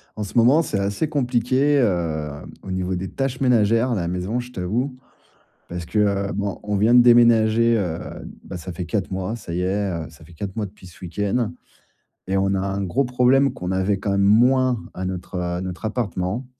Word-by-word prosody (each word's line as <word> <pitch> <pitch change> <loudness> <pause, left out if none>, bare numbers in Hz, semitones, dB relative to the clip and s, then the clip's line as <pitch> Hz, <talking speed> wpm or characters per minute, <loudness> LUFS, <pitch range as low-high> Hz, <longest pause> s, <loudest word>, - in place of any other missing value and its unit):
En 105 - -3
ce 105 - -5
moment, 125 +7 +6
c'est 105 -10 -2
assez 100 +10 -1
compliqué, 135 +1 +2
heu, 85 - 0 0.3
au 95 - -10
niveau 95 0 -2
des 90 +1 -4
tâches 135 -1 -3
ménagères 115 -1 +3
à - - +1
la 85 -4 -2
maison, 90 +7 -2
je 125 0 -7
t'avoue. 120 +7 -2 0.8
Parce 85 -1 -5
que, 105 - -2
heu, 100 -1 +1
bon, 100 -1 -3
on 105 0 -1
vient 110 +4 +3
de 125 - +9
déménager, 115 -1 +5
heu, 85 -5 -2 0.5
bah, 90 - -7
ça 85 +2 -7
fait 90 +2 -5
4 95 +4 -2
mois. 95 +4 -3
Ça 85 -7 -7
y 90 - -1
est, 100 +2 0
heu, 85 -3 -4
ça 80 - -17
fait 85 +2 -16
4 95 +3 -6
mois 110 -2 -1
depuis 95 -1 -15
ce 85 - -15
week-end 100 +6 -1 0.8
et 95 - 0
on 95 0 +1
a - - 0
un 100 +1 -2
gros 120 +10 0
problème 125 +2 +3
qu'on 90 -5 -4
avait 95 +2 +1
quand 100 - -2
même 100 - +2
moins 125 +4 +4
à 95 - -5
notre, 95 0 -5
heu, 90 - -1
à 90 0 -2
notre 95 +3 -6
appartement, 105 0 -2
100 Hz, 215 wpm, -22 LUFS, 90-120 Hz, 0.8 s, de